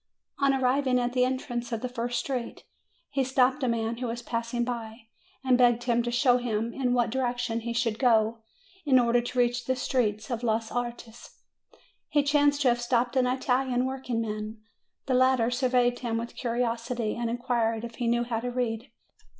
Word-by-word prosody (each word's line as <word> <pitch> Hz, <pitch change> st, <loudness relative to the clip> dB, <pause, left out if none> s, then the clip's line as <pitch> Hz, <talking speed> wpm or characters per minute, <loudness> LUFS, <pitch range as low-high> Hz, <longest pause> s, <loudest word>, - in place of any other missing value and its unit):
On 275 Hz, -1 st, +4 dB
arriving 260 Hz, 0 st, +2 dB
at 245 Hz, 0 st, -1 dB
the 250 Hz, -1 st, +3 dB
entrance 245 Hz, -2 st, -3 dB
of 225 Hz, -1 st, -2 dB
the 255 Hz, -, -2 dB
first 245 Hz, 0 st, -3 dB
street, 245 Hz, -1 st, -4 dB, 0.5 s
he 270 Hz, -, +1 dB
stopped 260 Hz, +1 st, +2 dB
a -, -, +2 dB
man 230 Hz, 0 st, -1 dB
who 250 Hz, 0 st, -3 dB
was 235 Hz, +1 st, -4 dB
passing 230 Hz, +1 st, -2 dB
by, 230 Hz, -1 st, -5 dB, 0.4 s
and 255 Hz, -1 st, +3 dB
begged 240 Hz, -1 st, +4 dB
him 240 Hz, -1 st, +2 dB
to 240 Hz, -, -2 dB
show 245 Hz, +1 st, +3 dB
him 230 Hz, -1 st, -2 dB
in 250 Hz, -2 st, 0 dB
what 240 Hz, -2 st, +1 dB
direction 245 Hz, -2 st, -1 dB
he 235 Hz, +1 st, -4 dB
should 230 Hz, -2 st, -1 dB
go 225 Hz, -3 st, +3 dB, 0.4 s
in 275 Hz, -4 st, +4 dB
order 240 Hz, -1 st, +3 dB
to 245 Hz, +1 st, -6 dB
reach 245 Hz, 0 st, +1 dB
the 260 Hz, -, 0 dB
street 225 Hz, -5 st, -1 dB
of 235 Hz, -1 st, -2 dB
los 225 Hz, -1 st, -1 dB
Artes. 240 Hz, -1 st, -6 dB, 0.7 s
He 290 Hz, -1 st, +3 dB
chanced 290 Hz, 0 st, +3 dB
to 255 Hz, -, +5 dB
have 240 Hz, 0 st, +1 dB
stopped 240 Hz, 0 st, 0 dB
an 255 Hz, -1 st, +3 dB
Italian 255 Hz, 0 st, +1 dB
workingman. 225 Hz, -5 st, -4 dB, 0.4 s
The 265 Hz, -, 0 dB
latter 255 Hz, -2 st, +3 dB
surveyed 245 Hz, -1 st, +2 dB
him 230 Hz, -2 st, -2 dB
with 235 Hz, +1 st, -5 dB
curiosity, 235 Hz, -1 st, -2 dB
and 235 Hz, -1 st, -2 dB
inquired 230 Hz, -2 st, -1 dB
if 230 Hz, -1 st, -10 dB
he 240 Hz, -, -1 dB
knew 235 Hz, +1 st, +2 dB
how 235 Hz, -2 st, -2 dB
to 245 Hz, +2 st, -3 dB
read. 240 Hz, -2 st, -2 dB
245 Hz, 185 wpm, -27 LUFS, 230-255 Hz, 0.7 s, to